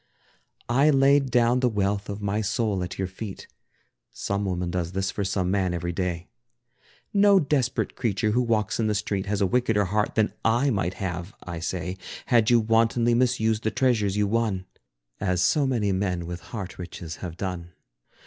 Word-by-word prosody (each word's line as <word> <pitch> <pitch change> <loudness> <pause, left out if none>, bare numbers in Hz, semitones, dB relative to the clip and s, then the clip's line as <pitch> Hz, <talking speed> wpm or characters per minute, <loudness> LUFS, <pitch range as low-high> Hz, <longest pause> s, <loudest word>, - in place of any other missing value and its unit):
I 135 +5 +4
laid 135 -1 +4
down 120 0 +3
the 125 -1 +2
wealth 100 -1 -1
of 105 +1 -5
my 105 +2 0
soul 105 -1 0
at 95 +1 -6
your 95 - -1
feet 95 +2 -8 0.7
(Some 100 0 -2
woman 90 -2 -2
does 90 -1 -2
this 95 0 -1
for 100 - -3
some 95 -1 0
man 95 -3 +1
every 85 0 -2
day). 90 -1 -3 0.9
No 200 -1 +6
desperate 135 -6 0
creature 110 -2 0
who 120 +4 +2
walks 115 -4 0
in 110 - +2
the 105 - +1
street, 100 -1 -2
Has 100 0 -1
a - - +4
wickeder 110 0 +2
heart 105 +3 0
than 110 -1 +2
I 120 +5 +3
might 95 -4 -1
have, 90 +1 -5
I 85 -2 -6
say, 90 +2 -3 0.3
Had 120 -3 +3
you 120 -1 +6
wantonly 115 +1 +2
misused 115 -3 +2
the 110 - +1
treasures 110 -4 +1
you 105 - +3
won, 105 -3 0 0.5
As 90 -2 0
so 145 +6 +3
many 115 -6 +1
men 90 -3 -1
with 85 0 -5
heart 95 -6 -6
riches 85 -2 -7
have 85 -2 -7
done. 90 -3 -5
105 Hz, 180 wpm, -25 LUFS, 95-115 Hz, 0.9 s, No